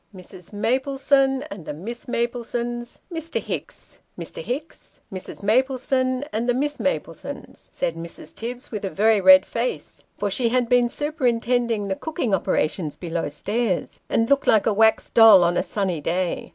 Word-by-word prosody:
" -, -, -19 dB
Mrs. 180 Hz, -1 st, -12 dB
Maplesone 270 Hz, +4 st, +1 dB
and 195 Hz, -, -7 dB
the 150 Hz, -, -6 dB
Miss 235 Hz, -, -7 dB
Maplesones, 240 Hz, 0 st, -3 dB, 0.2 s
Mr. 325 Hz, 0 st, -3 dB
Hicks. -, -, -7 dB, 0.2 s
Mr. -, -, -6 dB
Hicks 300 Hz, -, -6 dB
Mrs. 190 Hz, +1 st, -8 dB
Maplesone 255 Hz, +3 st, +1 dB
and 230 Hz, +3 st, -1 dB
the 245 Hz, -, +3 dB
Miss 290 Hz, +3 st, -1 dB
Maplesones," 280 Hz, -, -4 dB
said 170 Hz, -, -2 dB
Mrs. 165 Hz, -1 st, -9 dB
Tibbs, 240 Hz, +2 st, -6 dB
with 210 Hz, -3 st, -5 dB
a 195 Hz, -, -1 dB
very 215 Hz, +2 st, +3 dB
red 280 Hz, +5 st, +8 dB
face, -, -, -4 dB
for 205 Hz, -1 st, -1 dB
she 235 Hz, +3 st, +1 dB
had 250 Hz, 0 st, +1 dB
been 245 Hz, 0 st, +3 dB
superintending 245 Hz, -7 st, 0 dB
the 190 Hz, -, -1 dB
cooking 305 Hz, -, -3 dB
operations 160 Hz, -3 st, 0 dB
below 170 Hz, -3 st, -3 dB
stairs, 205 Hz, +6 st, -2 dB
and 225 Hz, -, +2 dB
looked 280 Hz, +1 st, +2 dB
like 215 Hz, -, +4 dB
a 220 Hz, -, +2 dB
wax 220 Hz, +2 st, +3 dB
doll 220 Hz, -5 st, +8 dB
on 175 Hz, 0 st, +2 dB
a -, -, +2 dB
sunny 185 Hz, -6 st, -2 dB
day. 175 Hz, +3 st, -2 dB
235 Hz, 165 wpm, -23 LUFS, 195-260 Hz, 0.2 s, red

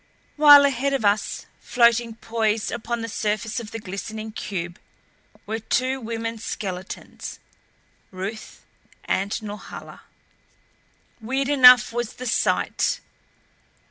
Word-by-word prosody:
While 290 Hz, -1 st, +9 dB
ahead 275 Hz, 0 st, 0 dB
of 225 Hz, -, -2 dB
us, 205 Hz, +1 st, 0 dB
floating 235 Hz, -2 st, +2 dB
poised 225 Hz, -2 st, -1 dB
upon 235 Hz, 0 st, -3 dB
the 230 Hz, -, -4 dB
surface 215 Hz, +1 st, -2 dB
of 225 Hz, -3 st, -8 dB
the 225 Hz, -, -6 dB
glistening 215 Hz, +2 st, -6 dB
cube, 175 Hz, -5 st, -5 dB, 0.7 s
were 220 Hz, +2 st, -3 dB
two 260 Hz, +4 st, -1 dB
women 230 Hz, 0 st, -4 dB
skeletons 190 Hz, -3 st, -6 dB, 0.7 s
Ruth 200 Hz, +4 st, -7 dB, 0.4 s
and 195 Hz, +1 st, -1 dB
Norhala! 205 Hz, 0 st, -9 dB, 1.2 s
Weird 265 Hz, +4 st, -1 dB
enough 250 Hz, -5 st, +7 dB
was 240 Hz, -2 st, -3 dB
the 255 Hz, -, -8 dB
sight. 235 Hz, -, 0 dB
225 Hz, 110 wpm, -23 LUFS, 210-245 Hz, 1.2 s, While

